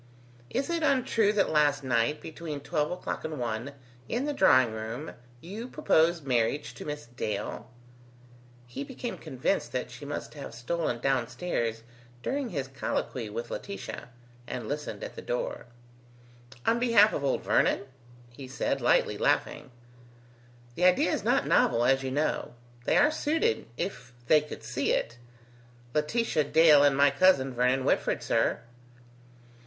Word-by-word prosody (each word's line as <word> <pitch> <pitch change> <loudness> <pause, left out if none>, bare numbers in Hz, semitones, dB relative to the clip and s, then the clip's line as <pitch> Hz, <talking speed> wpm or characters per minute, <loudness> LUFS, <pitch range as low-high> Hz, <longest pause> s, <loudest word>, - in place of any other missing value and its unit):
"Is 270 +6 -2
it 335 -1 0
untrue 255 -7 +2
that 205 - +2
last 145 -2 +3
night, 125 +3 +1
between 160 -2 -6
twelve 150 0 -1
o'clock 180 - -4
and 155 -1 -4
one, 120 +3 -3 0.4
in 245 +5 -1
the 295 - -1
drawing 130 - +5
room, 110 +7 -5 0.3
you 210 +8 -7
proposed 170 - +2
marriage 125 +3 0
to - - -9
Miss 150 0 -5
Dale?" 120 -1 -5 1.0
He 120 +3 -6
became 240 - -6
convinced 130 -4 -2
that 125 - -3
she 120 +4 -10
must 145 0 -5
have 140 -6 -8
stolen 125 +2 -2
down 130 -3 +1
stairs 120 -5 -3 0.4
during 275 -2 -2
his 140 -8 -3
colloquy 130 -3 -3
with 115 +3 -5
Laetitia, 200 -9 -6 0.4
and 125 - -5
listened 150 - -4
at - - -7
the - - -7
door. - - -3 1.0
"On 230 +1 +3
behalf 230 -3 +5
of 140 - -2
old 135 - 0
Vernon?" - - +2 0.5
he 130 +2 -10
said, 130 - -2
lightly - - +2
laughing. - - 0 1.0
"The 180 - 0
idea 180 0 +4
is - - -1
not - - +2
novel, 120 +1 +3
as 135 +1 +3
you 135 - -3
know. 145 -2 -1 0.3
They - - +3
are 295 +1 +5
suited, 325 +9 0
if 125 -9 -5
they 150 +5 +5
could 150 - -9
see 120 +5 -1
it. 115 +1 -2 0.7
Laetitia 155 +1 +1
Dale 150 -1 +6
and 140 -1 +4
my 140 0 +5
cousin 140 -4 +3
Vernon 125 +2 +1
Whitford, - - +1
sir." - - +1
145 Hz, 150 wpm, -28 LUFS, 125-185 Hz, 1.0 s, Dale